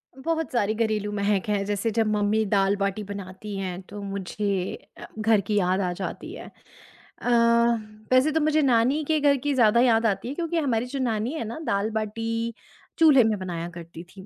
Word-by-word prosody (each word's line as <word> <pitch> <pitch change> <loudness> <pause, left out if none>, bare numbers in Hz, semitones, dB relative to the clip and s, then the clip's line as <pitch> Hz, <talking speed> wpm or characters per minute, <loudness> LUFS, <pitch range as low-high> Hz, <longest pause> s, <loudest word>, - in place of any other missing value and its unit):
बहुत 320 +4 -2
सारी 215 -4 +1
घरेलू 215 -2 -1
महक 200 -1 0
है। 205 -1 +1
जैसे 205 +2 -1
जब 225 0 +1
मम्मी 210 +1 +1
दाल-बाटी 200 +1 +1
बनाती 200 0 -7
हैं, 185 -1 -4
तो 205 +2 -10
मुझे 195 -1 -3 0.2
अ, - - -9
घर 215 -1 +3
की 205 +2 -2
याद 185 -1 +2
आ 180 -2 -1
जाती 185 +1 -6
है। - - -9 0.7
अ, - - -2 0.8
वैसे 255 +4 +4
तो 320 - +1
मुझे 310 +1 +2
नानी 265 +3 +2
के 310 -1 +2
घर 285 -1 +3
की 290 - +2
ज़्यादा 235 -2 +4
याद 230 -2 +3
आती 200 0 0
है, 275 - -4
क्योंकि 340 -1 -2
हमारी 245 -7 0
जो 275 - -1
नानी 235 +1 -1
है 315 - -3
ना, 230 +7 -6
दाल-बाटी 225 +2 -2 0.5
चूल्हे 295 -6 +7
में 220 -1 +1
बनाया 175 -2 -4
करती 170 -1 -10
थीं। 190 +2 -14
215 Hz, 185 wpm, -25 LUFS, 200-245 Hz, 0.8 s, चूल्हे